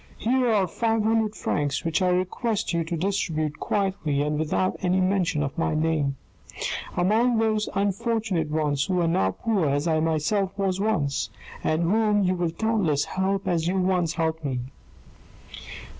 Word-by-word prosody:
Here 250 +1 +1
are 205 -3 +3
five 225 +4 0
hundred 220 -1 +1
francs 145 +1 -1
which 165 +3 +1
I 185 - +3
request 195 +4 -1
you 170 0 +1
to 170 +1 -3
distribute 160 -5 -1
quietly, 190 -8 0
and 150 0 -1
without 160 +4 0
any 185 0 +2
mention 180 -5 +1
of 140 - -4
my 160 - 0
name, 155 -3 0 0.8
among 220 +7 +3
those 215 -1 +1
unfortunate 200 -3 0
ones 150 -2 0
who 185 -2 0
are 170 - +2
now 95 - +2
poor 190 - 0
as 145 +2 0
I 160 -1 +2
myself 165 +5 0
was 190 -1 0
once, 160 -11 0 0.3
and 155 +2 +1
whom 210 +3 +2
you 185 0 +2
will 175 -2 -1
doubtless 170 -6 0
help 195 +1 -1
as 165 -2 +1
you 185 +2 0
once 180 -3 +1
helped 160 -1 -1
me." 130 -3 -2
180 Hz, 160 wpm, -25 LUFS, 155-205 Hz, 0.8 s, are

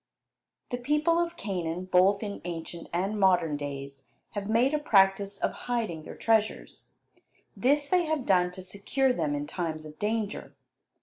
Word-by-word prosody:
The 245 - -2
people 300 +6 +2
of 340 0 -1
Canaan, 180 - -3
both 185 +3 +4
in 205 -1 -5
ancient 170 0 -6
and 195 +5 -1
modern 180 -5 +3
days, 140 -1 -6 0.3
have 205 -1 -4
made 240 +6 +3
a 300 - +2
practice 200 -6 +3
of - - 0 0.2
hiding 220 -10 -1
their - - -8
treasures. 220 -1 0 0.7
This 285 +3 +2
they 360 +2 +3
have 310 -5 -1
done 180 -2 +3
to 185 0 -8
secure 210 +8 0
them 150 -8 -1
in 145 0 -3
times 160 -2 -4
of 155 0 -12
danger. 215 0 -2
200 Hz, 160 wpm, -28 LUFS, 170-245 Hz, 0.7 s, both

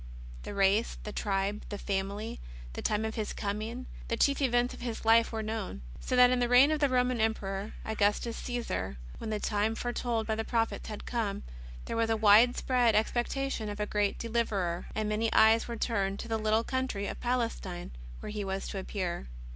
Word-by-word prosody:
The - - -7
race, 200 +3 +2
the 210 - -5
tribe, 200 0 -1
the 205 - -4
family, 200 +3 -3 0.3
the - - -5
time 215 +1 0
of 220 - -3
His 215 -2 -3
coming, 220 +5 -3 0.2
the 230 - -1
chief 280 +3 +3
events 245 -2 +2
of - - -10
His 235 -2 -4
Life 230 +1 +5
were 220 -1 -3
known. 215 - -4 0.2
So 255 - -2
that 250 0 +7
in 255 - +2
the 245 -1 +1
reign 255 +4 +7
of 310 - +1
the 285 -2 +3
Roman 250 -2 +2
Emperor, 200 -2 -1
Augustus 220 +2 +1
Caesar, 240 - -3 0.2
when 225 - -5
the 215 -1 -1
time 210 +2 0
foretold 240 -1 -1
by 220 - 0
the 220 +1 -1
prophets 225 0 -1
had 210 - -7
come, 225 - -2 0.4
there - - -4
was 230 0 +2
a 225 - +2
widespread 230 +2 +5
expectation 240 +1 0
of 205 0 -6
a 210 - +1
great 205 -1 0
Deliverer, 210 -7 -1
and 215 -1 0
many 215 +2 0
eyes 220 +1 +5
were 235 -1 -4
turned 200 -4 0
to - - -7
the 225 -1 -1
little 220 +1 +2
country 260 -6 -2
of - - -5
Palestine 230 -8 -2 0.3
where - - -6
He 210 -1 -3
was 195 0 -3
to 195 - -4
appear. 185 - -3
220 Hz, 195 wpm, -30 LUFS, 205-240 Hz, 0.4 s, that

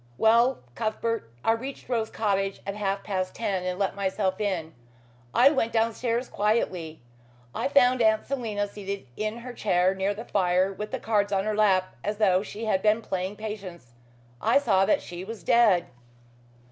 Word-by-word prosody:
Well, 235 - +4
Cuthbert, 220 - -2 0.2
I - - +5
reached 260 +5 -4
Rose 230 -3 -1
Cottage 195 -2 -1
at 200 - -3
half 200 -1 -2
past 185 -2 -3
ten 195 -5 -1
and 180 0 -2
let 195 -1 -1
myself 195 0 -1
in. 175 -6 -2 0.6
I 260 - +6
went 230 -6 0
downstairs 230 +2 0
quietly. 185 - -1 0.5
I - - -1
found 255 -3 +4
Aunt 220 -1 +3
Selina 220 -7 -2
seated 200 -2 -6
in 215 +1 -3
her 245 +1 -8
chair 185 -4 +2
near 195 +1 -1
the 225 +3 -7
fire 185 0 +1
with 210 +2 -6
the - - -4
cards 205 -2 +1
on 195 -1 +1
her 215 0 0
lap, 190 -3 +2
as 210 +1 -2
though 190 -4 +3
she 215 +2 -6
had 190 -3 +1
been 215 +2 +2
playing 190 +1 -3
'Patience.' 195 - -8 0.5
I - - +4
saw 195 -9 +3
that - - +2
she 175 +1 -7
was 220 +2 -8
dead." 220 -7 +4
205 Hz, 170 wpm, -26 LUFS, 190-225 Hz, 0.6 s, I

